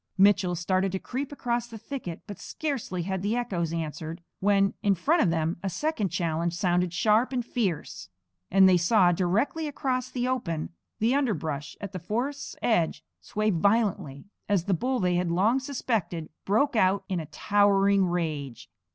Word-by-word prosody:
Mitchell 190 -2 +4
started 185 +3 0
to - - 0
creep 270 +7 -4
across 240 -4 -2
the 230 -1 -9
thicket, 215 -8 -6
but 205 - -9
scarcely 255 - -3
had 190 +1 -2
the 205 +4 0
echoes 185 -10 -1
answered 165 0 -5 0.2
when, 195 0 +3
in 200 -1 +3
front 310 - +2
of 185 - +3
them, 165 0 0
a 195 - -2
second 265 - -1
challenge 170 -1 -1
sounded 180 -2 +1
sharp 215 +6 +2
and 245 -3 -1
fierce; 170 - -3 0.4
and 190 0 +6
they 185 -1 +6
saw, 180 +1 +4
directly 200 - 0
across 260 -3 -2
the 250 -1 -2
open, 170 -12 -2 0.3
the 230 +4 +2
underbrush 160 - -1
at 200 -2 -6
the 185 - -5
forest's 250 - -3
edge 175 -9 +1 0.2
sway 215 0 -1
violently, 195 -7 +1 0.2
as 200 -4 +2
the 195 - 0
bull 255 +8 0
they 180 -1 +1
had 180 -1 0
long 205 +9 +3
suspected 225 - -2 0.2
broke 245 +7 +2
out 195 -2 +3
in 185 -3 -1
a 160 - -6
towering 200 +2 +3
rage. 155 -7 -3
195 Hz, 170 wpm, -27 LUFS, 175-235 Hz, 0.4 s, and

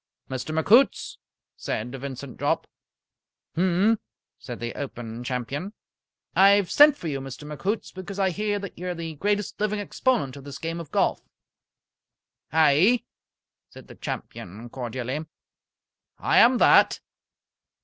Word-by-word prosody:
"Mr. 130 +4 -4
McHoots?" 235 - +3 0.4
said 115 +3 -4
Vincent 135 -1 -7
Jopp. - - 0 0.9
"Mphm!" 190 +5 +2 0.4
said 125 -2 -8
the 120 0 -4
Open 120 -4 -6
Champion. 135 - -4 0.6
"I 195 +1 +7
have 200 -3 +1
sent 295 0 +7
for 170 - -6
you, 140 -3 -3
Mr. 135 +2 -8
McHoots, 180 +9 -3
because 185 +1 -7
I 190 -2 +2
hear 205 +3 -1
that 200 -2 -7
you 180 - -5
are 180 - -3
the 165 -1 -5
greatest 205 +6 -1
living 210 0 0
exponent 205 - 0
of 140 - -10
this 140 0 -8
game 165 +1 -4
of 165 -4 -8
golf." - - +1 1.3
"Aye," 160 - +4 0.7
said - - -14
the - - -10
champion, 110 +7 -7
cordially. 130 +3 -4 0.9
"I - - +3
am 245 +2 +6
that." - - +5
165 Hz, 135 wpm, -25 LUFS, 135-200 Hz, 1.3 s, I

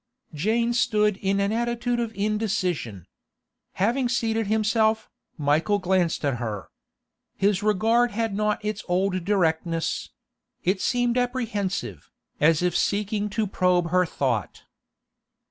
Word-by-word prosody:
Jane 225 +9 +1
stood 210 -5 +2
in 195 0 0
an 200 +1 +1
attitude 240 +1 -1
of 230 -2 -2
indecision. 195 - -1 0.7
Having 240 +6 +1
seated 225 -2 0
himself, 220 +1 +1 0.3
Michael 155 +7 +2
glanced 185 -5 0
at 135 -3 0
her. 110 -5 -5 0.7
His 200 0 +1
regard 225 +4 +3
had 225 -1 -2
not 210 +1 -1
its 210 0 -3
old 185 0 0
directness; 165 -3 0 0.5
it 190 +2 +1
seemed 245 0 +1
apprehensive, 210 - -3 0.3
as 160 +2 +4
if 180 -1 +1
seeking 210 0 0
to 215 +1 -1
probe 180 -3 +1
her 180 -1 +3
thought. 125 - -2
205 Hz, 120 wpm, -25 LUFS, 180-225 Hz, 0.7 s, as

